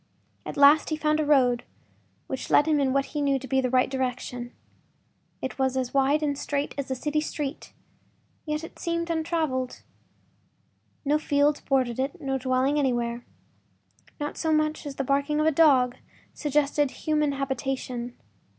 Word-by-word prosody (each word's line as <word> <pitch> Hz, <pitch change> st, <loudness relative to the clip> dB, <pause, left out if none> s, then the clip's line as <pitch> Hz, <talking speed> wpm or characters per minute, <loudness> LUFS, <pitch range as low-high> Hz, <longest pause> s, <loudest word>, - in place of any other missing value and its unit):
At -, -, -6 dB
last 285 Hz, +2 st, +6 dB
he 310 Hz, -, 0 dB
found 305 Hz, 0 st, +1 dB
a 305 Hz, -, +1 dB
road 250 Hz, -5 st, +4 dB, 0.6 s
which 265 Hz, -, -5 dB
led 295 Hz, -, +5 dB
him 310 Hz, -2 st, +2 dB
in 270 Hz, -2 st, +2 dB
what 275 Hz, +1 st, +1 dB
he 295 Hz, -, -1 dB
knew 280 Hz, -1 st, +2 dB
to 265 Hz, 0 st, -8 dB
be 265 Hz, 0 st, +2 dB
the 255 Hz, -, 0 dB
right 255 Hz, 0 st, +3 dB
direction. 250 Hz, -2 st, -3 dB, 0.9 s
It 260 Hz, -, -4 dB
was 265 Hz, 0 st, +1 dB
as 255 Hz, -2 st, -2 dB
wide 280 Hz, +3 st, +3 dB
and 285 Hz, -1 st, 0 dB
straight 285 Hz, 0 st, -2 dB
as 280 Hz, -2 st, -4 dB
a 260 Hz, -, -1 dB
city 300 Hz, +4 st, -1 dB
street, 295 Hz, -2 st, -5 dB, 0.8 s
yet 300 Hz, +1 st, -2 dB
it 330 Hz, -, -10 dB
seemed 335 Hz, 0 st, -2 dB
untraveled. 315 Hz, -6 st, -2 dB, 1.2 s
No 295 Hz, +2 st, +2 dB
fields 290 Hz, 0 st, +2 dB
bordered 260 Hz, -3 st, 0 dB
it, 280 Hz, +8 st, -2 dB
no 270 Hz, -3 st, -2 dB
dwelling 260 Hz, +3 st, +1 dB
anywhere. 240 Hz, -3 st, -1 dB, 0.9 s
Not 295 Hz, 0 st, -4 dB
so 320 Hz, -, 0 dB
much 310 Hz, 0 st, 0 dB
as 280 Hz, -, -6 dB
the 275 Hz, -, -2 dB
barking 280 Hz, +3 st, +1 dB
of 305 Hz, -, +2 dB
a 315 Hz, -, +4 dB
dog 270 Hz, -5 st, +4 dB, 0.4 s
suggested 295 Hz, -1 st, +1 dB
human 300 Hz, 0 st, 0 dB
habitation. 265 Hz, -3 st, -3 dB
280 Hz, 165 wpm, -26 LUFS, 260-300 Hz, 1.2 s, last